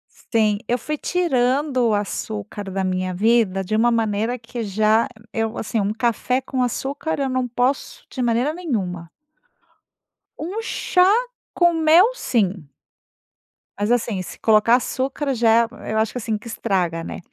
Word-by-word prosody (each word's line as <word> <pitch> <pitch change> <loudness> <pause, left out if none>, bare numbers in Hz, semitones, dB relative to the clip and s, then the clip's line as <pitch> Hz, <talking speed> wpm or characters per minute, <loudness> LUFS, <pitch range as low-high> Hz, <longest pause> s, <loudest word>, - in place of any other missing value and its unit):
Sim, 215 -3 0
eu 245 - +1
fui 305 +4 -4
tirando 265 -6 +1
o - - +2
açúcar 205 0 -4
da 190 0 -1
minha 185 0 -1
vida 205 -1 +2
de 205 +3 -2
uma 235 +2 +3
maneira 225 +1 0
que 230 +1 -6
já 215 +2 +2 0.3
eu 225 0 -2
assim 225 +1 -2
um 205 +1 0
café 240 +2 0
com 260 -1 -2
açúcar 275 +6 -2
eu 275 -1 0
não 255 -1 -1
posso 255 - -1
de 255 - -5
maneira 240 +5 +1
nenhuma. 190 - -3 1.3
Um 375 +8 -4
chá 365 -4 +2 0.4
com 345 -1 +3
mel 330 +7 +5
sim. 195 - -1 1.1
Mas 205 +3 0
assim, 230 -5 0
se - - -10
colocar 220 +1 +4
açúcar 270 +2 -2
já 230 0 +4 0.2
eu 220 0 0
acho 220 0 +1
que, - - -6
assim, 225 -2 -2
que 220 - -12
estraga, 180 -7 -1
né. - - -6
230 Hz, 150 wpm, -22 LUFS, 210-260 Hz, 1.3 s, mel